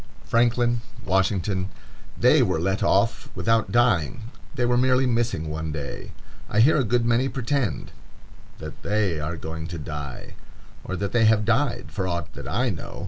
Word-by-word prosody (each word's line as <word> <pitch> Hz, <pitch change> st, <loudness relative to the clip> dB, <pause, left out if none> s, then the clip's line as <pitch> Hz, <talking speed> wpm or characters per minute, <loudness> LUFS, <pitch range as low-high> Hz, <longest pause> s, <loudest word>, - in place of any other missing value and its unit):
Franklin,—Washington,—they 115 Hz, -6 st, 0 dB
were -, -, +1 dB
let 95 Hz, +3 st, 0 dB
off 115 Hz, +6 st, +1 dB
without 115 Hz, 0 st, +1 dB
dying; 115 Hz, -, +1 dB, 0.2 s
they 125 Hz, -3 st, +1 dB
were 120 Hz, 0 st, +2 dB
merely 130 Hz, +1 st, +3 dB
missing 115 Hz, -9 st, 0 dB
one 80 Hz, +1 st, -4 dB
day. 75 Hz, -2 st, -6 dB, 0.4 s
I 105 Hz, -, +1 dB
hear 140 Hz, +8 st, +6 dB
a 140 Hz, -, +2 dB
good 120 Hz, +1 st, +1 dB
many 120 Hz, +3 st, +2 dB
pretend 135 Hz, -2 st, -2 dB, 0.7 s
that -, -, -9 dB
they 100 Hz, -6 st, 0 dB
are 80 Hz, +3 st, -3 dB
going 80 Hz, +1 st, -6 dB
to 85 Hz, 0 st, -6 dB
die; 75 Hz, -4 st, -7 dB, 0.5 s
or 95 Hz, -, -4 dB
that 100 Hz, +2 st, -3 dB
they 120 Hz, -2 st, +3 dB
have 110 Hz, -1 st, +4 dB
died, 120 Hz, +1 st, 0 dB
for 95 Hz, -3 st, -2 dB
aught 85 Hz, -3 st, -3 dB
that -, -, -8 dB
I 120 Hz, +3 st, 0 dB
know. 80 Hz, -, -7 dB
110 Hz, 155 wpm, -24 LUFS, 85-120 Hz, 0.7 s, hear